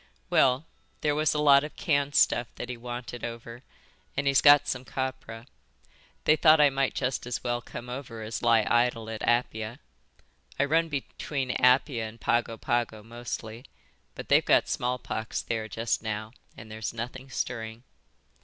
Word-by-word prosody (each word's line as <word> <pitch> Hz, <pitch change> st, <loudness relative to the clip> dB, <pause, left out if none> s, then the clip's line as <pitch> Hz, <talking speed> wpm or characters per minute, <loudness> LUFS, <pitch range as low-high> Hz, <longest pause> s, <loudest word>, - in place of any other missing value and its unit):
"Well, 130 Hz, +4 st, +3 dB, 0.4 s
there 150 Hz, -, +1 dB
was 155 Hz, +1 st, +1 dB
a -, -, +1 dB
lot 140 Hz, -1 st, +6 dB
of 150 Hz, -, -7 dB
canned 145 Hz, -3 st, 0 dB
stuff 120 Hz, -, +3 dB
that -, -, -6 dB
he 125 Hz, -, -3 dB
wanted 120 Hz, 0 st, -7 dB
over, 115 Hz, 0 st, -7 dB, 0.6 s
an' 145 Hz, -, 0 dB
he's 140 Hz, -1 st, +4 dB
got 145 Hz, 0 st, +7 dB
some 125 Hz, -1 st, -2 dB
copra. 130 Hz, -3 st, -5 dB, 0.8 s
They 155 Hz, -, +5 dB
thought 155 Hz, 0 st, +6 dB
I 145 Hz, -1 st, +6 dB
might 135 Hz, 0 st, 0 dB
just 125 Hz, -2 st, -2 dB
as 125 Hz, -2 st, -3 dB
well 120 Hz, -1 st, -1 dB
come 120 Hz, 0 st, -9 dB
over 125 Hz, -3 st, -7 dB
as 110 Hz, +1 st, -5 dB
lie 115 Hz, -2 st, +4 dB
idle 120 Hz, -2 st, +1 dB
at 110 Hz, -, -6 dB
Apia. 120 Hz, -1 st, 0 dB, 0.8 s
I 140 Hz, -, +4 dB
run 165 Hz, +3 st, +2 dB
between 135 Hz, -2 st, -3 dB
Apia 125 Hz, -3 st, +3 dB
and 115 Hz, +2 st, -15 dB
Pago 115 Hz, -1 st, 0 dB
Pago 120 Hz, -4 st, -1 dB
mostly, 115 Hz, 0 st, -7 dB, 0.5 s
but -, -, -8 dB
they've -, -, +5 dB
got -, -, +3 dB
smallpox 120 Hz, -3 st, -3 dB
there 110 Hz, -2 st, -3 dB
just 115 Hz, +2 st, -2 dB
now, 110 Hz, 0 st, -4 dB, 0.3 s
and 110 Hz, 0 st, -11 dB
there's 110 Hz, +1 st, -5 dB
nothing 125 Hz, +3 st, -6 dB
stirring." 115 Hz, -2 st, -4 dB
120 Hz, 165 wpm, -28 LUFS, 115-135 Hz, 0.8 s, got